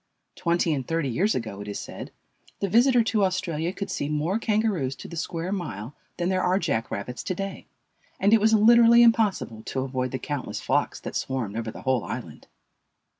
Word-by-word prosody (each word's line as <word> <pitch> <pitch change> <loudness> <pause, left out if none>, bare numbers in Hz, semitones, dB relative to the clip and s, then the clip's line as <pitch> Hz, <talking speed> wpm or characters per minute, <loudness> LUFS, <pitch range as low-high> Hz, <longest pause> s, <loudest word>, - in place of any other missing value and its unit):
Twenty 170 -1 +1
and 135 -4 -3
thirty 165 -4 0
years 190 - +1
ago, 110 -4 -4
it 105 - -8
is 100 - -4
said, - - -7 0.5
the 200 - 0
visitor 240 +4 +4
to 220 -2 +1
Australia 175 -3 -1
could 200 0 -5
see 150 -6 -2
more 155 +8 0
Kangaroos 210 - 0
to - - -10
the 170 - -9
square 165 +2 -3
mile 145 - -4 0.2
than 175 - -1
there 185 -1 +1
are 185 +1 +2
jack 140 - -1
rabbits 120 +5 -5
to 185 - -3
day, 195 +2 -5 0.5
and 200 +3 +4
it 225 - +6
was 220 +1 +5
literally 235 +2 +7
impossible 210 - +2
to 130 - -2
avoid 130 -1 -2
the 130 - -3
countless 145 0 -4
flocks - - 0
that - - -7
swarmed 125 -6 -2
over 115 0 -3
the - - -9
whole 130 -3 +1
island. - - -7
170 Hz, 195 wpm, -25 LUFS, 130-205 Hz, 0.5 s, literally